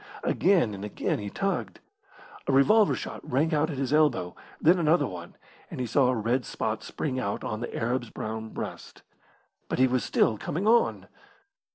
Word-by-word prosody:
Again 175 - +2
and 100 0 -7
again 105 - -2
he 105 -1 -5
tugged. 195 - -2 0.7
A - - +2
revolver 205 +11 +5
shot - - -6
rang 155 +6 0
out 155 +1 +2
at 145 - -5
his 135 +1 -1
elbow, 125 - +2 0.2
then 175 +3 +4
another 160 -2 +3
one, 85 -6 -8 0.3
and - - -7
he 125 - -1
saw 130 +3 +3
a 125 - +2
red 120 +3 0
spot 110 -1 -3
spring 130 -4 -3
out 100 -5 -3
on 110 - -3
the 120 - -5
Arab's 120 +1 -1
brown 110 0 -5
breast. - - -8 0.7
But - - -1
he 130 - +5
was 130 -1 +1
still 110 -2 +2
coming 180 +7 -3
on. 235 +1 +3
130 Hz, 180 wpm, -27 LUFS, 110-155 Hz, 0.7 s, revolver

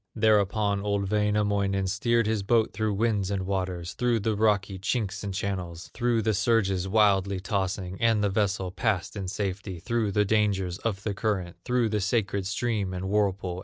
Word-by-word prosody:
Thereupon 105 -2 +2
old 100 -1 -1
Wainamoinen 105 -2 +1
Steered 115 +5 +1
his 110 -1 0
boat 110 +2 +2
through 105 0 -1
winds 105 -3 0
and 95 -2 -2
waters, 90 -3 -3
Through 120 -2 +1
the 110 +1 0
rocky 100 -3 +1
chinks 105 0 -2
and 100 - -3
channels, 95 -3 -4
Through 120 -2 +1
the 110 0 +2
surges 100 -3 +1
wildly 100 -2 +3
tossing; 95 0 -3
And 115 -2 +3
the 100 - +2
vessel 100 -2 0
passed 100 -1 -1
in 100 -2 -4
safety 95 -1 -3
Through 110 +1 -1
the 105 +1 +3
dangers 100 -3 +1
of 100 -4 -3
the 105 - -1
current, 95 -4 -2
Through 125 -2 +1
the 105 -1 0
sacred 100 -2 0
stream 100 -2 -1
and 95 +1 -4
whirlpool. 95 -3 0
100 Hz, 170 wpm, -27 LUFS, 95-110 Hz, -, wildly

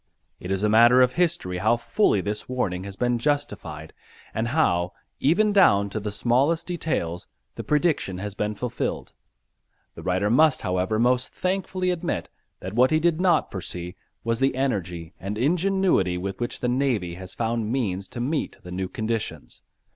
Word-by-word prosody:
It 90 - -7
is 95 +1 -1
a - - +4
matter 120 +4 +6
of 125 - +2
history 160 - 0
how 110 +5 +3
fully 120 - +2
this 105 +4 -4
warning 95 -8 -2
has 100 -1 -7
been 120 +3 0
justified 115 - -2 0.4
and 110 +1 -1
how, 90 - +1 0.3
even 205 +9 +3
down 100 - +5
to 110 - -2
the 105 0 -4
smallest 135 +10 +1
details, 155 - -3 0.3
the - - -6
prediction 150 - +1
has 100 +1 -5
been 105 +1 -2
fulfilled. 125 +3 -3 0.8
The - - -10
writer 95 +3 0
must, 155 +3 +4
however, 90 +4 0
most 125 +2 +2
thankfully 185 0 -1
admit 175 -2 -3 0.3
that 95 +2 -6
what 125 +3 +4
he 155 - +3
did 170 +1 +1
not 185 -2 +3
foresee 90 -1 -6 0.3
was 115 0 0
the 135 -1 +2
energy 90 -11 -2
and 100 +3 -4
ingenuity 170 - +2
with 95 +1 -4
which 120 - -3
the 125 - 0
navy 125 -9 0
has 95 +1 -8
found 115 -1 -1
means 100 -7 -1
to - - -8
meet 145 +6 -2
the 90 - -9
new 95 +1 -2
conditions. 110 +2 -4
115 Hz, 170 wpm, -25 LUFS, 95-145 Hz, 0.8 s, matter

